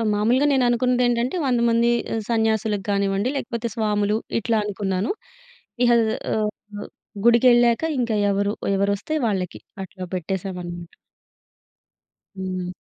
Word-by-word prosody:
ఆహ్, 225 - 0
మాములుగా 240 +7 +2
నేననుకున్నదేంటంటే, 245 +1 +2
100 245 -2 +2
మంది 235 +1 +3 0.2
ఆహ్, 225 - -1
సన్యాసులకు 220 -3 0
గానివ్వండి, 200 +3 0
లేకపోతే 235 -3 -3
స్వాములు 210 -1 +1 0.2
ఇట్లా 230 0 0
అనుకున్నాను. 195 -1 -2 0.8
ఇహ! 240 - +4 0.4
ఆహ్, 215 -1 0 0.8
గుడికెళ్ళాక 240 +1 +5 0.2
ఇంక 235 -2 -1 0.2
ఎవరు 200 +1 0 0.2
ఎవరొస్తే 200 +8 -1
వాళ్ళకి 180 - -2 0.2
అట్లా 185 0 -9
పెట్టేశామనమాట. 180 -1 -5 1.5
హ్మ్. 185 -1 -4
215 Hz, 105 wpm, -23 LUFS, 195-235 Hz, 1.5 s, గుడికెళ్ళాక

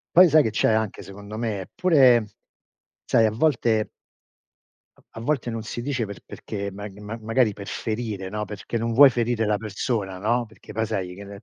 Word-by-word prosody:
Poi 180 +1 +9
sai 155 0 +6
che 110 - -1
c'è 110 - +2
anche 110 -2 -1
secondo 100 +3 -9
me? 110 -4 -2
Eppure 130 - +4 0.8
sai 115 - +4
a - - +2
volte 115 -3 +1 1.2
a - - -7
volte 125 -1 -1
non 115 -1 -4
si 120 +2 -5
dice 130 -3 -1
per 100 -2 -9
perché 100 -1 -6
mag 100 0 -9
ma 105 +3 -7
magari 115 +1 +2
per 100 0 -9
ferire, 110 -4 -4
no, 105 +2 -3
perché 105 +3 -5
non 115 +1 -1
vuoi 140 +4 +8
ferire 120 -2 0
la 105 -1 +1
persona, 105 -2 -3
no, 120 +5 0
perché 110 - -14
poi 110 0 -1
sai 95 -5 -3
che 100 - -9
ne 100 +1 -11
110 Hz, 190 wpm, -24 LUFS, 100-120 Hz, 1.2 s, Poi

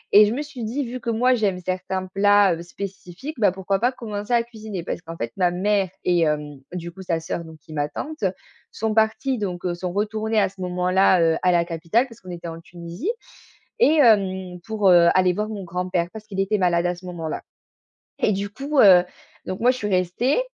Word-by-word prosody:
et 210 +1 +10
je 215 - -1
me 290 - -2
suis 280 -5 -8
dit: 255 +6 -2
«Vu 245 +2 -5
que 235 - -4
moi 245 +3 +3
j'aime 205 -6 0
certains 185 +1 -3
plats, 205 -1 +5
heu, 165 - -8
spécifiques, 195 - -8
bah, 205 -4 +4
pourquoi 190 +1 -1
pas 245 +2 +2
commencer 215 -3 -6
à 235 -1 +4
cuisiner?» 220 -6 -7
parce - - -4
qu'en 165 -1 -9
fait 115 0 -3
ma 180 -2 +3
mère 195 +1 +1
et 175 -1 +2
hem, 150 -3 -1
du 170 -1 -5
coup 190 +3 -12
sa 170 -3 -1
sœur 165 +1 -4
donc 160 -1 -12
qui 155 +2 -17
est - - -7
ma 145 0 -1
tante, 310 - -6 0.5
sont 220 0 -2
parties 220 +4 +1
donc, 185 -4 -4
heu, 175 - 0
sont 175 +1 -4
retournées 215 +2 0
à 200 - +2
ce 190 -1 -13
moment-là, 180 +1 +3
heu, 165 -1 +3
à 180 - +4
la 170 -1 +3
capitale 170 +9 0
parce 230 -2 -16
qu'on 185 - -12
était 170 -1 -7
en 165 0 -7
Tunisie 170 - -6 0.7
et 320 -9 +5
hem, 190 -6 +2
pour, 210 -3 +2
heu, 175 -1 +7
aller 185 -1 +4
voir 210 +3 -2
mon 205 -3 -5
grand-père 180 0 -2
parce 220 -1 -9
qu'il 195 -2 -5
était 205 +2 +1
malade 175 -2 +2
à 175 - +1
ce 180 +1 -14
moment-là 165 -3 -4 0.8
et - - +2
du 200 0 -2
coup, 275 +7 -2
heu, 185 -5 +8 0.4
donc 185 - -4
moi 245 +2 +4
je 255 - -5
suis 210 - -3
restée 190 - +1
190 Hz, 225 wpm, -23 LUFS, 175-220 Hz, 0.8 s, et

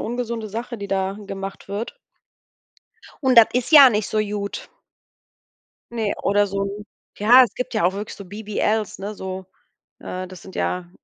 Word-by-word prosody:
ungesunde 235 -2 -3
Sache, 230 +2 -5
die 200 -1 -6
da 195 +1 -1
gemacht 195 0 -7
wird. 210 - -5 1.3
Und 260 -1 +3
das 230 -2 +10
ist 250 +5 -1
ja 280 -4 +10
nicht 210 -1 -1
so 215 - -1
gut. 205 -1 -3 1.2
Ne, 220 -3 -1
oder 205 +1 +3
so 200 +1 -4 0.3
ja, 240 +5 +8
es - - -7
gibt 250 - -4
ja 215 -5 0
auch 185 +2 +2
wirklich 205 +1 -6
so 200 - -9
BBLs, 210 +1 -2
ne, 205 +2 -5
so 190 -1 -6 0.5
äh, 185 0 -5
das 185 -1 -12
sind 190 - -12
ja 180 -1 -2
205 Hz, 165 wpm, -22 LUFS, 195-225 Hz, 1.3 s, das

